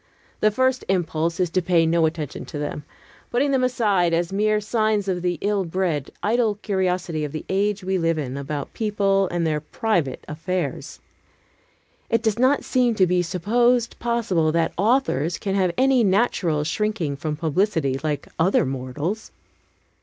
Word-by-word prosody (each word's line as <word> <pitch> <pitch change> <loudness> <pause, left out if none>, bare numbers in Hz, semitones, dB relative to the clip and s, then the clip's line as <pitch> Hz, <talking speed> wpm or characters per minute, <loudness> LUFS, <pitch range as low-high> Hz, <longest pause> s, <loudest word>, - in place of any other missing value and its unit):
The 215 - +4
first 260 +4 +1
impulse 170 -2 0
is 180 -2 +1
to 185 - +1
pay 170 -1 +3
no 165 0 +3
attention 155 -3 -5
to 155 - -7
them, 145 0 -4 0.5
putting 275 +4 +1
them 265 -2 +2
aside 205 -9 +2
as 170 +2 -1
mere 215 +1 +2
signs 215 -1 0
of 180 -2 -1
the 175 -1 -1
ill 205 -1 +1
bred, 170 -5 -1
idle 220 0 +2
curiosity 185 -5 -1
of 150 - -3
the 155 - -6
age 200 +1 0
we 190 0 0
live 165 -1 +1
in 135 -4 -3
about 140 0 -5
people 200 -3 +1
and 175 -1 -1
their 155 -2 0
private 165 - -1
affairs. 155 -3 -4 1.1
It 230 -1 +1
does 220 0 0
not 260 +3 +3
seem 250 -3 +2
to 190 - +4
be 180 0 +2
supposed 235 +7 +1
possible 215 -10 +1
that 165 -1 +1
authors 195 - +1
can 195 - -3
have 190 -2 +2
any 260 -2 +4
natural 190 -7 +1
shrinking 175 -2 -1
from 150 +2 -3
publicity, 160 -4 0
like 150 -2 -2
other 180 -1 +3
mortals. 135 - -4
185 Hz, 160 wpm, -23 LUFS, 160-215 Hz, 1.1 s, The